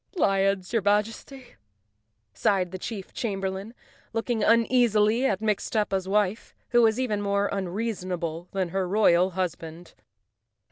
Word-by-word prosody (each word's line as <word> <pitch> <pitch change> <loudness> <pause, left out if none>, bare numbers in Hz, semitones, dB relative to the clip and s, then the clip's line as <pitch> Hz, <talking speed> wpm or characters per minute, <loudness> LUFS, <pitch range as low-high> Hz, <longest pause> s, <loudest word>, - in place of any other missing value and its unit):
"Lions!" 195 - +1
your 230 - +2
Majesty, 220 +6 -2 0.8
sighed 185 - +1
the 185 - -6
chief 200 -1 -7
chamber¬ 195 -5 -2
lain, 200 +5 -8 0.4
looking 225 -1 -1
uneasily 230 0 +3
at 200 -3 -1
Mustafa's 210 -2 -1
wife, 205 +1 0
who 240 -1 +4
was 225 +1 +3
even 215 -5 -1
more 200 0 +1
unreasonable 185 -4 -3
than 190 -3 -1
her 190 +1 -1
royal 185 -2 +4
husband. 170 -2 -4
200 Hz, 125 wpm, -26 LUFS, 185-225 Hz, 0.8 s, who